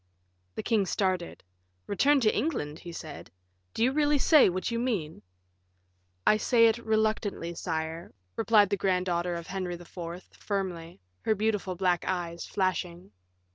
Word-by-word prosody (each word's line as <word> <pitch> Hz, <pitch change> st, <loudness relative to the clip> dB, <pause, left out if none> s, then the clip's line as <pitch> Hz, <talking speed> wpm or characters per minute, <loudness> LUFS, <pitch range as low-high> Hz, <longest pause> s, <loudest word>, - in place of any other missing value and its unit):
The -, -, -4 dB
king 210 Hz, -4 st, +1 dB
started. 185 Hz, -3 st, -1 dB, 0.4 s
"Return 275 Hz, +8 st, +3 dB
to 215 Hz, -2 st, +3 dB
England," 205 Hz, -, -2 dB
he 175 Hz, -, -9 dB
said; 155 Hz, -3 st, -8 dB, 0.5 s
"do 225 Hz, -, +1 dB
you 255 Hz, -, +4 dB
really 295 Hz, +1 st, +2 dB
say 295 Hz, -, +6 dB
what 185 Hz, +4 st, -2 dB
you 230 Hz, -, -1 dB
mean?" 205 Hz, -11 st, -2 dB, 1.0 s
"I 215 Hz, -, +5 dB
say 230 Hz, +1 st, +4 dB
it 225 Hz, +1 st, +3 dB
reluctantly, 215 Hz, -6 st, -1 dB
sire," 160 Hz, 0 st, -4 dB, 0.2 s
replied 215 Hz, -3 st, +4 dB
the 200 Hz, -, +2 dB
grand 185 Hz, -1 st, +1 dB
daughter 175 Hz, -1 st, -1 dB
of 170 Hz, -1 st, -6 dB
Henry 185 Hz, -1 st, -4 dB
IV., 175 Hz, 0 st, -8 dB
firmly, 180 Hz, -4 st, -4 dB, 0.2 s
her 220 Hz, -, +1 dB
beautiful 210 Hz, -3 st, -1 dB
black 180 Hz, -1 st, +1 dB
eyes 170 Hz, -2 st, -3 dB
flashing. 185 Hz, -2 st, -2 dB
190 Hz, 145 wpm, -28 LUFS, 170-220 Hz, 1.0 s, say